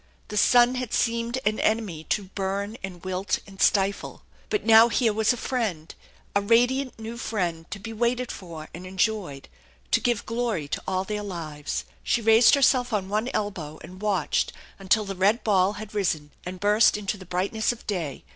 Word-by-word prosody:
The 210 - -6
sun 240 +3 +5
had 255 -3 -3
seemed 235 +1 0
an 215 +1 +1
enemy 215 -8 0
to 210 - 0
burn 195 +2 -3
and 180 -2 -8
wilt 185 +1 -1
and 195 -1 -11
stifle. 195 0 +1 0.3
But 420 - -1
now 225 +1 +8
here 230 -2 +2
was 220 +2 +2
a 245 - -2
friend, 210 -12 -3 0.4
a 200 - +4
radiant 245 +5 +2
new 225 +1 -7
friend, 175 -8 -3
to - - -5
be 225 +3 -7
waited 240 +2 0
for 165 -4 -9
and 180 +2 -8
enjoyed, 185 -7 -1 0.4
to - - +4
give 240 -4 0
glory 230 -9 -2
to - - -3
all 185 0 0
their 210 +1 -4
lives. 160 -7 -5 0.2
She - - +1
raised 225 +3 +6
herself 260 -3 +3
on 195 -3 -1
one 215 +4 0
elbow 175 -8 -3
and 185 +1 -11
watched 200 -6 0 0.3
until 205 +2 +2
the 195 - -4
red 200 +5 +2
ball 195 -2 +3
had 210 0 -9
risen 160 -8 -1 0.2
and 185 0 -6
burst 210 +2 +4
into 210 0 -2
the 190 - -11
brightness 195 +6 0
of 240 - -10
day. 170 -10 -3
205 Hz, 185 wpm, -25 LUFS, 185-230 Hz, 0.4 s, now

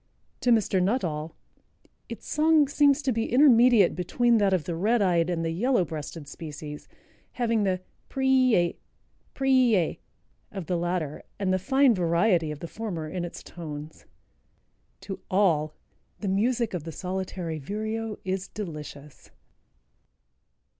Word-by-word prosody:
To 250 - 0
Mr. 215 -5 +3
Nuttall 170 -7 -1 0.7
"its - - -8
song 310 -1 +4
seems 285 0 +3
to 265 - +1
be 225 -1 -2
intermediate 245 - +6
between 235 +6 +2
that 200 -2 +3
of 185 -4 +1
the 170 - -4
red 215 +8 +2
eyed 175 -4 +2
and 165 -2 -1
the 165 - -1
yellow 220 +3 +1
breasted 155 -1 -7
species, 150 -1 -8 0.5
having 230 -3 0
the 185 -1 0 0.3
'preai, 255 -9 +2 0.6
preai,' 255 - +2 0.5
of 190 -4 -6
the 180 - -1
latter 170 -3 -2 0.2
and 190 -2 0
the 185 - +1
fine 265 +4 +4
variety 170 -2 +2
of 150 -1 -6
the 170 - -5
former 180 -6 -5
in 180 +2 -4
its 175 - -7
tones." 155 -2 -9 1.0
To 195 - -6
all 165 -6 +2 0.4
"the 205 - -4
music 230 +4 +1
of 175 -4 -3
the 165 - -6
Solitary 180 -2 -4
Vireo 215 +6 -4
is 190 0 -2
delicious." 150 -7 -9
190 Hz, 135 wpm, -26 LUFS, 165-230 Hz, 1.0 s, intermediate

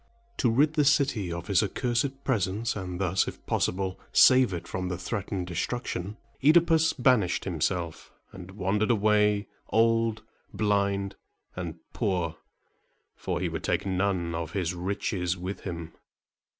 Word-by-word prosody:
To 125 - +2
rid 145 +7 +3
the 155 -1 +3
city 135 - +2
of 85 0 -5
his 100 -3 +3
accursed 125 +6 -1
presence, 110 -2 0
and 90 -3 -5
thus, 95 0 +1
if - - -8
possible, 95 0 -1
save 130 -3 +6
it 85 -2 -5
from 90 -1 -3
the 90 - -3
threatened 95 0 -3
destruction, 100 +1 -3 0.3
OEdipus 160 +1 +5
banished 125 -8 +2
himself, 85 -1 -2 0.2
and 90 -1 -10
wandered 100 +3 0
away, 105 -2 +3 0.2
old, 115 -1 +2 0.3
blind, 100 -2 0 0.4
and 85 -3 -5 0.2
poor, 90 -7 -1 0.8
for - - -3
he - - 0
would - - -5
take - - 0
none 95 -3 0
of 80 -1 -4
his 90 -3 -1
riches 90 0 -2
with 90 +3 -5
him. 85 -3 -6
100 Hz, 135 wpm, -27 LUFS, 90-115 Hz, 0.8 s, save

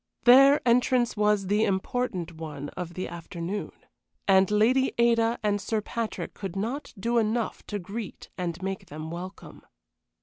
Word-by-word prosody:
Their 270 +2 +7
entrance 245 0 +3
was 210 -2 +2
the 205 +3 +2
important 190 -3 -1
one 150 -3 -7
of 175 -2 -7
the 185 - -3
afternoon, 170 +3 -5 0.6
and 190 -1 +5
Lady 235 +6 +3
Ada 235 0 +3
and 205 -1 +1
Sir 220 +1 -1
Patrick 225 +1 -4
could 195 -3 -6
not 235 +9 -3
do 235 +4 +2
enough 225 +1 -1
to 210 - -3
greet 205 +3 -7
and 175 -2 -3
make 195 0 -4
them 155 +2 -7
welcome. 180 +3 -8
205 Hz, 145 wpm, -27 LUFS, 180-235 Hz, 0.6 s, Their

